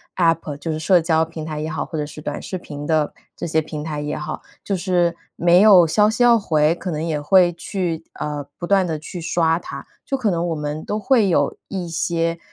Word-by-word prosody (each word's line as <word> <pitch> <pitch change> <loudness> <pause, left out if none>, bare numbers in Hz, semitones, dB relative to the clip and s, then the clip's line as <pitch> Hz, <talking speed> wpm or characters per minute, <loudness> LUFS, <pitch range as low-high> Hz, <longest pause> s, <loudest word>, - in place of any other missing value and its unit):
App 165 -4 +1
就 160 +3 -4
是 155 - -3
社 175 +3 +4
交 160 -1 +2
平 160 -1 -6
台 155 -1 -4
也 155 - -3
好， 155 -2 -3
或 160 - -6
者 150 - -1
是 150 - -10
短 150 -1 -5
视 185 - -5
频 145 -4 -8
的 155 -2 +1 0.2
这 - - -5
些 160 -1 +2
平 150 -1 -6
台 150 -2 -4
也 150 0 -3
好。 150 - -5 0.2
就 200 - -1
是 175 -2 +1 0.2
没 175 +1 +5
有 200 -5 +8
消 210 +6 +3
息 230 +2 +1
要 235 -1 +6
回， 155 -6 +2
可 180 +2 -6
能 155 -3 -2
也 155 -3 -2
会 175 +2 +4
去 170 -2 -3
呃， 150 -1 -4
不 175 - -4
断 195 0 +3
地 160 - -2
去 165 +3 -8
刷 165 0 +1
它。 140 -4 -8 0.2
就 275 - -2
可 225 -6 +1
能 170 0 -1
我 165 - -1
们 150 +1 -4
都 210 +1 -2
会 225 -4 +3
有 145 -5 +2
一 185 -3 -4
些 165 0 -1
165 Hz, 260 characters per minute, -21 LUFS, 155-180 Hz, 0.2 s, 有